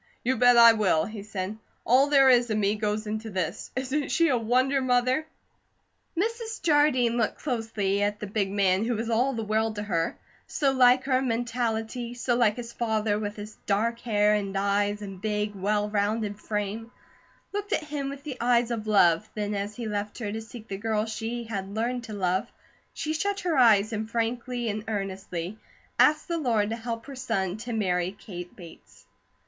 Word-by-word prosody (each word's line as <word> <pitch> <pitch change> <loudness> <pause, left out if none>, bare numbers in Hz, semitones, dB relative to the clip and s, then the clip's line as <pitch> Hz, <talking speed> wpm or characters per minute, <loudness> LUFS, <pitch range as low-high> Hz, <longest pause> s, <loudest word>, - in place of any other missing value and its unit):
"You 260 +2 +1
bet 245 -1 +6
I 235 -1 +9
will!" 190 -8 +2
he 215 -1 -7
said. 205 0 -5 0.3
"All 260 +4 +5
there 275 -2 +6
is 245 -2 +5
of 215 - 0
me 205 -1 +2
goes 215 0 -2
into 215 +1 -4
this. 185 -1 -3
Isn't 265 +3 -1
she 335 0 +3
a 255 - +3
wonder, 255 +4 +2
Mother?" 255 +4 +1 0.9
Mrs. 450 +3 -2
Jardine 290 -7 +3
looked 220 -3 0
closely 225 -6 -1
at 205 0 0
the - - -4
big 200 -1 -1
man 195 0 +2
who 240 +1 0
was 225 +2 -3
all 250 +4 +2
the 225 -2 -3
world 220 +1 0
to 205 - -3
her, 170 -5 -1 0.3
so 280 -3 +1
like 255 -1 +5
her 260 -1 +2
in 265 - -1
mentality, 235 0 -2
so 240 0 0
like 230 -3 +3
his 235 -1 -7
father 220 -2 0
with 205 -1 -4
his 210 +1 -9
dark 230 +4 +1
hair 210 -3 +2
and 200 -2 -1
eyes 205 +1 0
and 195 -2 -8
big, 210 -1 -1
well 205 +2 0
rounded 210 0 -1
frame; 210 +2 -4 0.6
looked 410 0 -4
at - - +1
him 290 -2 -4
with 280 0 -8
the 280 -4 -6
eyes 240 0 +3
of 220 -2 -3
love, 195 -2 +4
then 210 -1 -2
as 205 +1 -3
he 235 -1 -5
left 205 0 -3
her 215 -4 -4
to 220 +1 -4
seek 225 0 -11
the 195 - -4
girl 215 0 0
she 225 +2 -4
had 200 -3 -5
learned 240 +2 -1
to 220 - -8
love, 190 +3 -1 0.4
she 310 - -3
shut 400 +5 -1
her 350 -4 0
eyes 225 -4 +5
and 215 0 -3
frankly 235 +1 -2
and 215 0 -2
earnestly 195 -2 -4 0.4
asked 305 +1 +4
the 335 -1 -1
Lord 225 -7 +1
to - - -1
help 230 0 -5
her 280 - -8
son 195 -7 -2
to 235 +2 -6
marry 180 -4 0
Kate 180 -3 -9
Bates. 170 -4 -14
220 Hz, 195 wpm, -27 LUFS, 205-245 Hz, 0.9 s, I